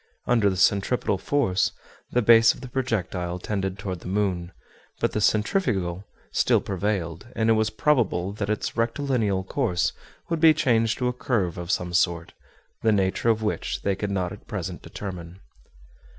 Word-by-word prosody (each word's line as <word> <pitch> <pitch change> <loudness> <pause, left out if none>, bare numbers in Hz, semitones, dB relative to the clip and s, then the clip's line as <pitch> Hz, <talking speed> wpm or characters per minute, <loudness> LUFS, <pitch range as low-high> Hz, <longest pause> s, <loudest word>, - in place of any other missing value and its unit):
Under 115 -4 +3
the 95 - -2
centripetal 100 +1 +2
force, 120 -10 +1 0.4
the 125 - +1
base 115 +1 +6
of - - -13
the 130 - -7
projectile 95 -9 -2
tended 95 0 -3
toward 95 -2 -5
the - - -10
moon; 90 -3 -1 0.5
but - - +1
the 105 - -1
centrifugal 105 - +1 0.3
still - - +3
prevailed; 95 -2 -3
and 115 0 +2
it - - +6
was 110 0 +2
probable 110 -6 +1
that 100 -1 -3
its 105 - -2
rectilineal 115 -5 0
course 115 -10 0 0.3
would 165 -1 -1
be 160 -1 +7
changed 115 -6 +2
to 125 - 0
a 125 - 0
curve 105 -9 -1
of 85 -1 -6
some 90 -2 -1
sort, 85 -1 +1 0.5
the 110 - +3
nature 100 +2 +1
of 110 -1 +2
which 105 - -2
they 100 -1 +1
could 105 +1 -3
not 90 -3 -1
at - - -11
present - - -5
determine. 90 -2 -8
105 Hz, 165 wpm, -25 LUFS, 90-115 Hz, 0.5 s, be